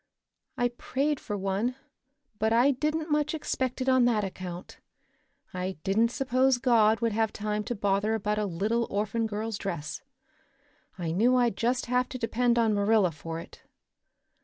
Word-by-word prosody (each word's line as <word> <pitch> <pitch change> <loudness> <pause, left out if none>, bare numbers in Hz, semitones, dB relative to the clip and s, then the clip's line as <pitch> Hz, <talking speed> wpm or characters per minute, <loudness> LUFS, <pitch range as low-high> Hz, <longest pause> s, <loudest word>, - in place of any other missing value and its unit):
"I 245 0 +2
prayed 275 +4 -2
for 210 - -4
one, 195 +6 -1 0.6
but 220 +1 +1
I 240 +5 +5
didn't 305 +4 -2
much 300 +1 +1
expect 260 -4 -2
it 255 - -2
on 260 -2 +5
that 225 -4 +2
account. 185 -2 -7 0.7
I 185 +1 -3
didn't 215 +4 +2
suppose 260 +1 +2
God 230 -3 +3
would 230 -1 +1
have 220 0 +1
time 210 0 -2
to 240 - -3
bother 205 +1 +1
about 210 0 -1
a 210 - 0
little 215 +7 0
orphan 215 +3 -1
girl's 215 0 -4
dress. 170 -7 -4 1.0
I 170 -3 -3
knew 230 +9 +3
I'd 240 -4 +2
just 245 +3 0
have 250 +1 +1
to 255 - -5
depend 240 +1 +1
on 225 -2 +3
Marilla 205 -2 +3
for 160 +2 -6
it. - - -12
225 Hz, 160 wpm, -28 LUFS, 200-250 Hz, 1.0 s, I